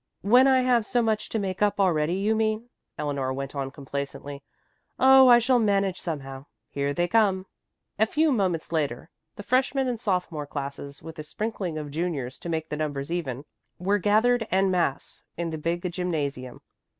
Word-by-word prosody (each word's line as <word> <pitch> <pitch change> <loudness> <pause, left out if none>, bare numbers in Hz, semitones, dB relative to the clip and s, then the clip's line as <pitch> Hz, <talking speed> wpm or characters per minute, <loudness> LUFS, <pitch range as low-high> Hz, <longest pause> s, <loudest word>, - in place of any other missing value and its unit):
"When 245 +6 +6
I 260 -1 +5
have 250 -2 +3
so 240 +2 +1
much 220 -1 -1
to - - -2
make 190 -2 -3
up 205 -1 +2
already, 170 -3 +2
you 205 +3 +1
mean," 220 +2 -1 0.3
Eleanor 140 -3 -2
went 135 +1 -5
on 135 -2 -3
complacently. 140 0 -6 0.6
"Oh, 265 0 +7
I 240 -1 +9
shall 245 +1 +3
manage 195 -4 +1
somehow. 135 -4 -6 0.2
Here 140 0 -1
they 175 +4 0
come." 190 -2 +2 0.5
A 220 - +4
few 310 +5 +2
moments 185 - 0
later 155 -4 -2 0.2
the 205 - -8
freshman 265 +3 +1
and 240 -3 -2
sophomore 180 -8 -2
classes, 140 0 -6
with 160 0 -9
a - - -4
sprinkling 190 -1 -4
of 150 -2 -6
juniors 145 -6 -3
to 170 - -7
make 160 -1 -2
the 150 - -3
numbers 145 -1 -3
even, 145 -6 -3 0.3
were 200 +3 +1
gathered 225 +4 +3
en 190 0 +2
masse 170 -7 -1 0.2
in 170 -1 -2
the 160 - -4
big 170 +3 -2
gymnasium. 145 -8 -3
175 Hz, 175 wpm, -26 LUFS, 145-215 Hz, 0.6 s, I